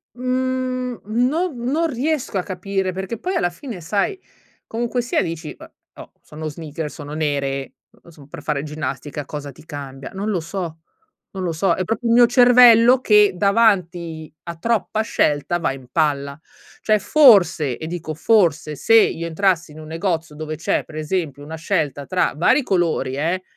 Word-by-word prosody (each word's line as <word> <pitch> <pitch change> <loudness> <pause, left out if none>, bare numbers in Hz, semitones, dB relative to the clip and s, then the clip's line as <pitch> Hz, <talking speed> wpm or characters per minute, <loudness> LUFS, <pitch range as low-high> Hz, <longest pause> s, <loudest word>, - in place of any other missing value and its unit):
Mhmm, 255 0 -2
non 260 - 0
non 310 +7 +1
riesco 275 -4 -2
a 180 - -1
capire 190 0 -3
perché, 190 +5 -5
poi, 370 +7 -3
alla 175 - +1
fine, 215 0 -9
sai, 200 - -1 0.5
comunque 240 +2 -2
sia, 240 - 0
dici: 165 -2 -5
"Eh, - - -14 0.2
oh, - - -12
sono 155 +1 -8
sneakers, 155 0 -6
sono 145 0 -8
nere, 140 -3 -2 0.4
son 150 -4 -16
per - - -10
fare 145 -2 -2
ginnastica. 150 -1 -5
Cosa 145 0 -7
ti 135 - -17
cambia?", 140 -3 -8
non 200 +3 -3
lo 195 -4 0
so, 165 -1 -5 0.5
non 190 -1 -5
lo 175 - -1
so. 170 +2 +1
È 185 - -2
proprio 225 +3 -2
il 230 - +3
mio 240 0 +8
cervello 245 0 +7
che, 210 -4 +5
davanti 180 -6 +1
a 170 -1 -6
troppa 220 +3 -1
scelta, 155 -5 0
va 155 - 0
in 130 -2 -12
palla 140 -3 0 0.4
cioè, 215 -1 +2
forse, 195 - +5
e 160 - -7
dico 165 -2 -5
forse, 160 -5 +2
se 225 +10 +3
io 170 -6 +3
entrassi 170 -1 0
in 155 - -12
un 155 - -10
negozio 165 -2 -3
dove 155 0 -5
c'è, 160 - -1
per 155 - -14
esempio, 155 -3 -3
una 155 +2 -7
scelta 155 -5 -2
tra 185 -1 +1
vari 180 - +3
colori, 170 - 0
eh, 170 +5 -1
175 Hz, 170 wpm, -21 LUFS, 155-225 Hz, 0.5 s, mio